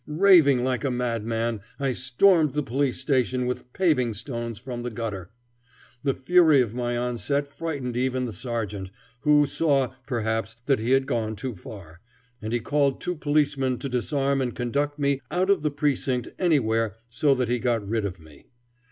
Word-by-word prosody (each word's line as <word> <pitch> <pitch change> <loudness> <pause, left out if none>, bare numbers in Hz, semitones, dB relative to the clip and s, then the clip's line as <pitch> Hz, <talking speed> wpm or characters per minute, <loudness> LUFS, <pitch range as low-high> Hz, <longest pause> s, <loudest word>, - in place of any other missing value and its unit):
Raving 155 -6 +5
like 130 0 -1
a 140 - +1
madman, 115 -2 -2 0.2
I 135 -2 0
stormed 150 +5 +3
the 150 0 0
police 135 +2 -1
station 130 -1 +1
with 125 0 -4
paving 130 - +1
stones 115 -1 -5
from 120 +1 -6
the 125 - -3
gutter. 105 -6 -5 0.7
The 135 -2 0
fury 160 0 +5
of 115 -4 +1
my 120 0 -2
onset 125 +4 -1
frightened 140 -5 -4
even 130 0 0
the 115 - -5
sergeant, 110 -6 -4 0.3
who 150 +2 +4
saw, 140 -3 +1
perhaps, 115 -2 -2
that 135 -3 +2
he 115 +2 -2
had 135 0 +4
gone 110 -4 -2
too 130 +3 -5
far, 90 -4 -11 0.4
and 110 +1 -4
he 120 - +1
called 140 +3 +1
two 180 - -2
policemen 145 -5 +1
to 140 - -5
disarm 135 +2 0
and 125 -3 -2
conduct 140 +4 -1
me 140 -1 0
out 185 +2 +1
of 200 - +2
the 150 - +1
precinct 140 -4 -1
anywhere 115 - +1
so 135 +4 +2
that 125 -2 0
he 120 +1 0
got 115 -3 0
rid 110 +1 -1
of 95 -3 -4
me. 80 -3 -17
125 Hz, 175 wpm, -25 LUFS, 115-140 Hz, 0.7 s, Raving